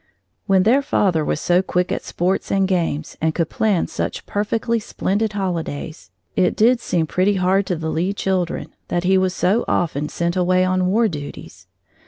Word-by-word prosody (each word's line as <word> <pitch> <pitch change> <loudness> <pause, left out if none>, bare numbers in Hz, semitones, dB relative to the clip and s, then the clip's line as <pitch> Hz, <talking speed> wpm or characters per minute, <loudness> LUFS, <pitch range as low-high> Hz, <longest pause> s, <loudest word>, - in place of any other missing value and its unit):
When 190 -2 +4
their 245 +7 +4
father 185 - +1
was 150 - -1
so 175 +2 +3
quick 180 -1 -1
at - - -1
sports 185 +3 -1
and 195 -1 +2
games 170 -5 -1
and 160 0 +1
could 165 -2 -1
plan 210 -5 +1
such - - -4
perfectly 225 +3 -1
splendid 210 0 -2
holidays, 170 - -4 0.3
it 180 - +2
did 240 +3 +4
seem 175 -7 0
pretty 185 +6 +1
hard 190 +1 +2
to 180 - 0
the 160 -1 -3
Lee 175 +4 0
children 190 -3 -2
that 175 - -1
he 190 +1 +3
was 185 -1 +1
so 200 +6 +2
often 150 -3 0
sent 170 +1 -2
away 185 0 +3
on 185 0 +1
war 225 +5 +3
duties. 145 -7 -8
185 Hz, 180 wpm, -20 LUFS, 170-200 Hz, 0.3 s, When